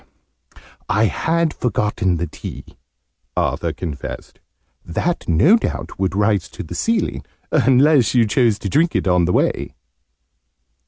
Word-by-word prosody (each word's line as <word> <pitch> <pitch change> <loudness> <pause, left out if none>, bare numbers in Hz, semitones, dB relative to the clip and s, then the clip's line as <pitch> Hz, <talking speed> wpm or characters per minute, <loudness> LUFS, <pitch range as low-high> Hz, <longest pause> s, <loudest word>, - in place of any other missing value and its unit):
"I 105 +2 +3
had 165 +7 0
forgotten 105 -6 -1
the 85 - -2
tea," - - -9 0.7
Arthur - - 0
confessed. 75 -6 -7 0.4
"That, 160 - -2
no 155 - +5
doubt, 225 - -5
would 95 -1 -1
rise 100 -3 +1
to - - -8
the 80 - -8
ceiling 230 0 -1 0.3
unless 135 -1 +4
you 120 -2 +5
chose 110 -1 +2
to 105 - -5
drink 160 - +1
it - - 0
on 90 -1 +3
the 90 - 0
way!" - - 0
105 Hz, 130 wpm, -20 LUFS, 90-150 Hz, 0.7 s, no